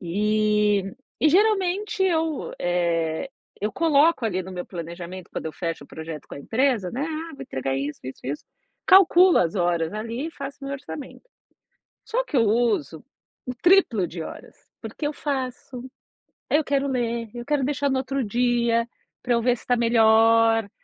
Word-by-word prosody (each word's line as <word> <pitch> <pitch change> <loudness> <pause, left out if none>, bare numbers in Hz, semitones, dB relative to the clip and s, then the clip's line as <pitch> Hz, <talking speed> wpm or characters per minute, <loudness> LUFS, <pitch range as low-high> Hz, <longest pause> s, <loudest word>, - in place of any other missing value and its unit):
E 210 +2 +1 0.4
e 310 - +5
geralmente 390 +1 +2
eu, 320 -4 0
eh, 170 +3 0 0.3
eu 210 +1 -1
coloco 320 -4 +3
ali 185 -4 0
no 190 +1 -9
meu 180 -1 -5
planejamento 170 +1 -8
quando - - -4
eu 155 - -5
fecho 165 -2 -4
o - - -17
projeto 160 -1 -8
com - - -8
a - - -8
empresa, 230 - 0
né, 265 +4 -3
ah, 320 +1 -5
vou 275 - -9
entregar 135 - -3
isso 140 +2 -4
isso 130 +1 -8
isso, 140 +3 -4 0.4
calculo 370 -1 +7
as 170 -2 +1
horas 170 -1 0
ali 230 +7 -4
e - - -10
faço 280 -1 -8
o - - -5
meu 280 - -3
orçamento, 285 - -9 0.8
só - - -1
que 330 - -3
eu 235 - +5
uso 210 - 0 0.4
o 250 - -3
triplo 345 - +4
de 165 0 -7
horas, - - -10 0.3
porque - - -6
eu 300 - -1
faço, 260 -3 -4 0.7
eu 300 +1 +3
quero 280 0 0
ler, 235 -3 -2
eu 240 0 -7
quero 290 -2 0
deixar 285 +1 0
no 265 - +1
outro 270 0 -2
dia, 235 +1 +1 0.4
para 245 -1 +1
eu 235 - +2
ver 245 +1 +2
se - - -16
está 245 - +1
melhor, 225 -1 +4
235 Hz, 175 wpm, -24 LUFS, 185-280 Hz, 0.8 s, calculo